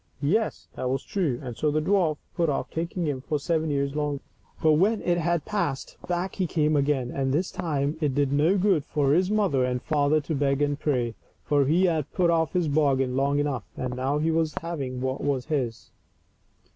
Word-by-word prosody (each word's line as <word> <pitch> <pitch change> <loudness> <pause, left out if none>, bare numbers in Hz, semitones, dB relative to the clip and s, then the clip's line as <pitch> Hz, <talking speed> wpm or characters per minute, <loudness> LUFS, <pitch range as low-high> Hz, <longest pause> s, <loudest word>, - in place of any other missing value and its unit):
Yes, 215 +10 0
that 125 - -3
was 135 +1 -1
true, 160 -11 -1
and 125 -3 -6
so 150 - 0
the 150 +1 +1
dwarf 165 -2 +2 0.2
put 170 -3 +1
off 140 - -2
taking 170 +1 -2
him 140 -4 -2
for 150 +3 -1
seven 160 +1 0
years 140 0 -1
longer. 145 -2 -2 0.4
But 160 - +4
when 200 +8 +3
it 175 -1 +1
had 170 -1 0
passed, 205 -10 -2
back 180 +2 -1
he 185 -3 0
came 155 -2 +1
again, 140 -3 +1
and 135 -1 -1
this 170 +7 0
time 150 -4 -1
it 145 -4 0
did 140 -1 +1
no 160 +7 +3
good 190 -6 +2
for 140 -1 +1
his 180 +3 +3
mother 200 -11 +2
and 125 0 0
father 150 +2 +2
to 155 +3 -4
beg 140 -1 +1
and 145 0 0
pray, 125 -6 0 0.3
for 145 -2 +2
he 175 +6 +4
had 160 -5 0
put 175 -2 +3
off 160 -1 +1
his 180 -3 +1
bargain 135 -4 +2
long 140 +2 +1
enough, 145 -3 -1
and 125 -1 -3
now 135 +3 0
he 160 +2 +1
was 160 -1 0
for - - -3
having 140 -7 -4
what 130 +1 -2
was 135 -3 0
his. 120 -6 -2
150 Hz, 210 wpm, -26 LUFS, 135-170 Hz, 0.4 s, But